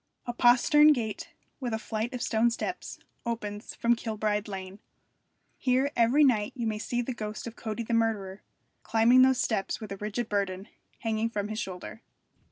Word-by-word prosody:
A 240 - -3
postern 260 +6 +6
gate, 220 -6 -4 0.3
with 245 -4 -2
a - - -1
flight 220 +1 -3
of 250 -1 -4
stone 225 +1 +2
steps, 360 +10 -4 0.3
opens 215 -3 -5
from 235 0 +2
Kilbride 215 -2 -2
Lane. 190 0 -7 0.8
Here 260 +2 +2
every 240 +6 +4
night 220 -7 +2
you 240 -3 -3
may 215 -1 -1
see 240 +2 -2
the 255 - -3
ghost 215 -2 -6
of 235 -1 -7
Cody 220 +1 -4
the 230 - -3
murderer, 210 -4 0 0.4
climbing 230 +3 +5
those 260 0 +5
steps 210 -4 -1
with 215 -2 -8
a 195 - -4
rigid 215 +3 -3
burden 195 -2 -2 0.3
hanging 225 0 0
from 205 -2 -3
his 215 0 -3
shoulder. 190 +3 -6
225 Hz, 175 wpm, -28 LUFS, 210-240 Hz, 0.8 s, postern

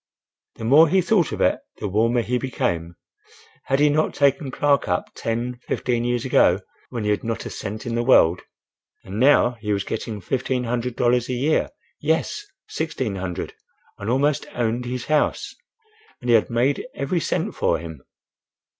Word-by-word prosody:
The - - -9
more 150 +7 +6
he 190 - +4
thought 185 -2 +2
of - - -4
it, - - +3 0.2
the - - -3
warmer 115 +4 +2
he 125 +2 -1
became. 85 -10 -2 0.7
"Had 135 - +1
he 150 - +5
not 155 +2 +1
taken 140 0 +2
Clark 140 0 +1
up 90 -1 -1
ten—fifteen 120 +1 -2
years 120 0 -1
ago, 95 -7 +4 0.3
when 120 -3 -4
he 105 - +1
had 105 - -1
not 115 -1 -3
a - - -5
cent 105 +2 -6
in 120 - -3
the 120 - +1
world, 90 -8 +4 0.6
and 95 +3 -6
now 125 -2 +4
he 105 -1 -2
was 100 -1 0
getting 105 +1 -4
fifteen 125 +4 -1
hundred 120 0 -2
dollars 120 0 +2
a - - -1
year—yes, 160 - -1 0.2
sixteen 130 -10 -3
hundred, 90 -2 -4 0.5
and 100 - -4
almost 140 +4 +1
owned 120 +1 -1
his 125 0 -4
house; 155 -1 0 0.7
and 125 -1 -1
he - - +7
had 110 - +3
made 125 - 0
every 140 +6 -1
cent - - -2
for - - +1
him!" 80 -4 -9
120 Hz, 170 wpm, -23 LUFS, 110-140 Hz, 0.7 s, he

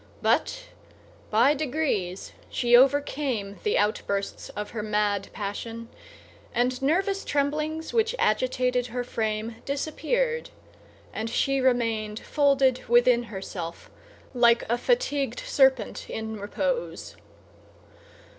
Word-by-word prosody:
But - - +1 0.7
by 235 +7 +4
degrees 270 - -2 0.2
she 240 -1 +3
overcame 265 -5 +2
the 425 - +1
outbursts 200 -1 -1
of 210 0 -5
her 220 - -4
mad 210 -2 0
passion; 225 +3 -5 0.7
and 250 +2 +1
nervous 385 +8 +1
tremblings 305 +3 -1
which 455 +1 +2
agitated 250 +2 +1
her 245 +1 -3
frame 220 -1 -3
disappeared, 470 - -1 0.6
and 225 +1 -3
she 275 +3 +1
remained 230 -4 +1
folded 275 -3 +2
within 240 0 +4
herself 190 -5 -7 0.4
like 235 -1 +4
a 235 - +2
fatigued 485 - 0
serpent 265 - +2
in 220 0 -4
repose. 485 - -3
250 Hz, 100 wpm, -26 LUFS, 220-290 Hz, 0.7 s, by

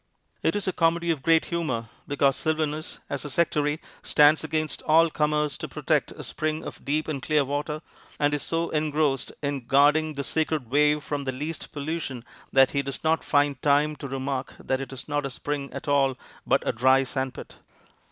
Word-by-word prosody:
It - - +1
is 205 -1 -1
a 185 - +1
comedy 170 0 +2
of 155 -5 -2
great 165 +2 +4
humor, 130 -10 -2 0.2
because 140 -1 +2
Sylvanus, 155 0 -2
as 140 - -3
a 150 - -5
sectary, 150 0 +1 0.2
stands 150 +1 +5
against 155 0 -2
all 165 +1 +5
comers 150 -1 0
to - - -4
protect - - 0
a - - -8
spring 155 0 -2
of - - -8
deep 155 +2 -1
and 145 -4 -3
clear 150 0 +2
water, 150 +3 -3 0.3
and 145 0 +2
is 145 - 0
so 165 +1 -1
engrossed 150 -3 0
in 140 -4 -2
guarding 150 +3 +4
the 140 - -3
sacred 155 -5 -1
wave 150 +1 +3
from 145 -2 -3
the 130 - 0
least 150 +5 -6
pollution 145 -4 -4 0.3
that 135 -1 +5
he 140 - +1
does 140 -1 -6
not 160 +1 +2
find 145 -2 +2
time 150 +1 +3
to 140 - -6
remark 135 0 -3
that 130 0 -1
it 135 - -6
is 135 - -8
not 145 -1 -1
a 140 - -2
spring 140 +2 -4
at - - -7
all, 135 -2 +2 0.3
but - - +2
a - - +3
dry 130 +3 +4
sand 130 -1 -3
pit. - - -10
145 Hz, 195 wpm, -26 LUFS, 135-155 Hz, 0.3 s, stands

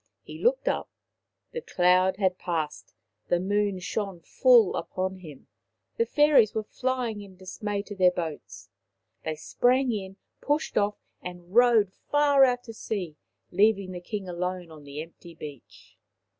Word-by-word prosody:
He - - -10
looked - - +2
up. - - 0 0.6
The 475 - -4
cloud 185 - +3
had 185 -2 +1
passed, 160 -4 -4 0.3
the 175 - +2
moon 200 +1 0
shone 195 0 -4
full 240 0 +4
upon 190 0 -3
him, 155 -7 -12 0.5
the 465 0 +1
fairies 295 -8 +4
were 220 - 0
flying 250 -2 -2
in 195 -2 -12
dismay 200 +2 -4
to 205 - -8
their 185 -2 +5
boats. 110 - -6 0.5
They 155 - -2
sprang 250 - +2
in, 195 -3 -5 0.2
pushed 295 +2 -1
off, 205 0 +1 0.2
and 180 0 -9
rowed 230 -5 +5
far 290 -2 +3
out 245 -1 +3
to 225 - -9
sea, 190 -8 -4 0.4
leaving 200 0 +3
the 180 -1 -7
King 200 +1 -5
alone 180 -1 -4
on 150 -2 -13
the 145 +2 -6
empty 165 0 -15
beach. 145 -5 -12
190 Hz, 150 wpm, -27 LUFS, 175-225 Hz, 0.6 s, their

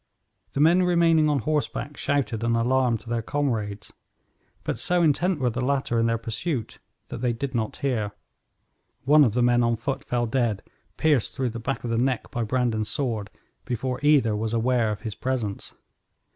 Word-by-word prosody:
The - - -2
men 165 +5 +5
remaining 170 -3 +4
on 145 - +2
horseback 145 +1 -2
shouted 135 -7 -1
an 115 0 +2
alarm 125 0 +2
to 115 - -18
their 120 0 -1
comrades, 110 -7 -2 0.7
but - - -3
so 175 -1 +2
intent 165 +3 +2
were 125 -2 +1
the 120 +3 -3
latter 130 -3 0
in 115 - +2
their 115 0 +1
pursuit 115 - -3 0.3
that - - -6
they 125 -2 +1
did 135 +3 -4
not 110 -3 -2
hear. 115 -7 -1 0.9
One 150 +2 +6
of 115 -5 +1
the 125 - +3
men 120 0 +4
on 115 0 +2
foot 135 +4 -3
fell 120 -1 -1
dead, 115 -4 0 0.3
pierced 150 -7 +2
through 130 -3 -1
the 115 - -6
back 135 +4 -3
of 120 - -3
the 115 - +1
neck 125 -1 -1
by 120 - -2
Brandon's 115 -2 0
sword, 115 -8 -2 0.3
before 125 +1 -3
either 145 -7 +4
was 110 +2 -2
aware 115 -1 +2
of 105 - -5
his 110 -3 -5
presence. 120 -5 -3
125 Hz, 185 wpm, -25 LUFS, 115-140 Hz, 0.9 s, One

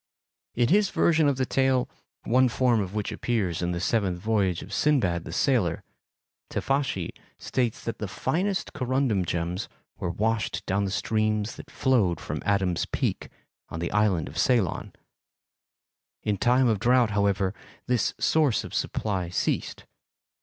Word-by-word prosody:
In 120 0 +2
his 205 +3 +4
version 160 -2 +3
of 140 - +2
the 130 - +1
tale, 130 -1 +2 0.4
one 130 +2 +3
form 120 -2 +2
of 95 +1 -5
which 105 -2 -2
appears 100 -9 -1
in 90 0 0
the 85 - -2
seventh 95 -1 0
voyage 100 -4 0
of - - -10
Sindbad 95 - +1
the - - -7
Sailor, 90 - +1 0.7
Teifashi 135 - -1 0.3
states 120 -4 -2
that 115 - -4
the 105 - -3
finest 180 - -1
corundum 130 -6 0
gems 85 +4 -2 0.3
were - - -2
washed 110 +5 -1
down 100 +1 0
the - - -2
streams 110 +1 0
that - - -11
flowed 110 -10 +1
from - - -5
Adam's 95 -4 +1
Peak, - - -2 0.4
on 80 - -5
the 85 - -2
island 105 -6 +2
of 80 - -6
Ceylon; 115 - +1 1.3
in 105 - +1
time 125 +1 +4
of 110 -4 +1
drought, 120 0 +3
however, 100 -2 +1 0.3
this 125 -1 0
source 150 -7 +2
of - - -9
supply 95 -5 -2
ceased. 90 - -2
110 Hz, 150 wpm, -26 LUFS, 95-130 Hz, 1.3 s, his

